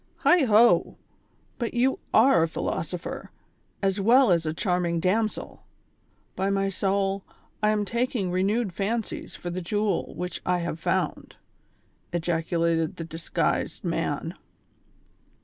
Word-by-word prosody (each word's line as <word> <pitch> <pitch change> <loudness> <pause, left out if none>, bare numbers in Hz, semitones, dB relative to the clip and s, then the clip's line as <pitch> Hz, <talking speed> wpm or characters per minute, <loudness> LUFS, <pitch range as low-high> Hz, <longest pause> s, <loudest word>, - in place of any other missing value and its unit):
"Heigh 350 -5 +5
ho! 230 +1 +4 0.6
but 235 -1 -3
you 255 +2 +2
are 245 -3 +5
a 165 - +3
philosopher, 165 +1 -4 0.5
as 195 +1 +1
well 240 +2 +5
as 165 -2 +2
a - - +1
charming 175 0 0
damsel; 215 +5 -1 0.7
by 190 - 0
ray 195 0 +1
soul, 195 0 0 0.4
I 210 - +3
am 210 -1 +1
taking 235 -3 -1
renewed 195 +3 0
fancies 215 +4 -3
for 175 - -6
the 185 +1 -3
jewel 205 +4 -1
which 180 -1 -4
f 180 0 +1
have 170 -1 -4
found,'' - - -2 0.8
ejaculated 165 -1 0
the 165 - -5
disguised 165 +1 -2
man. - - -2
195 Hz, 125 wpm, -26 LUFS, 170-215 Hz, 0.8 s, Heigh